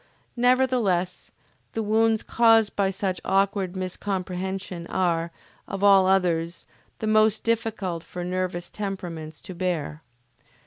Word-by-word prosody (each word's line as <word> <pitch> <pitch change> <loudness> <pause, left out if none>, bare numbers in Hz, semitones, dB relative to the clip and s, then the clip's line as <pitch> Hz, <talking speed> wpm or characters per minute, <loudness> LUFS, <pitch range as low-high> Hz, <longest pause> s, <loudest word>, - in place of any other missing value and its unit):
Nevertheless 245 -8 +1 0.4
the 225 - -1
wounds 220 +1 +2
caused 225 -2 +4
by 195 -1 +2
such 190 -1 -2
awkward 195 -1 +1
miscomprehension 185 -1 -4
are, 170 -2 0 0.4
of 195 0 -5
all 195 -2 +6
others, 175 -3 +1 0.3
the - - -4
most 215 0 +3
difficult 215 -7 -1
for 180 0 -7
nervous 180 -1 -3
temperaments 175 -6 -5
to 185 - -8
bear. 170 -4 -2
190 Hz, 110 wpm, -25 LUFS, 180-215 Hz, 0.4 s, all